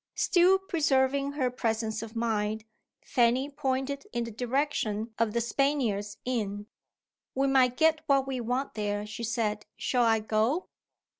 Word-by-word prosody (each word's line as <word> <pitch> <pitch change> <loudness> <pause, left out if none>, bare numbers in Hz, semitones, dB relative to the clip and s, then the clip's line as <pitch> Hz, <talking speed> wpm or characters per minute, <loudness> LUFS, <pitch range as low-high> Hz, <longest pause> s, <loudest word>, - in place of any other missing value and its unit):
Still 365 0 +4
preserving 280 -6 +1
her 260 -4 0
presence 220 -2 -1
of 225 0 -8
mind, 220 -1 -1 0.4
Fanny 250 +3 +2
pointed 270 0 -2
in 240 0 -1
the 230 - -6
direction 235 -3 -1
of 225 -2 +1
"The 235 - +1
Spaniards" 235 -6 0
inn. 205 -5 -2 0.7
"We 270 +1 +2
might 260 -2 +3
get 320 -1 +3
what 275 -2 +3
we 265 -2 -3
want 250 +4 -2
there," 205 -1 -2
she 220 +2 -7
said. 215 -2 -1
"Shall 250 -2 +1
I 225 -1 +4
go?" 220 - 0
245 Hz, 145 wpm, -28 LUFS, 220-275 Hz, 0.7 s, Still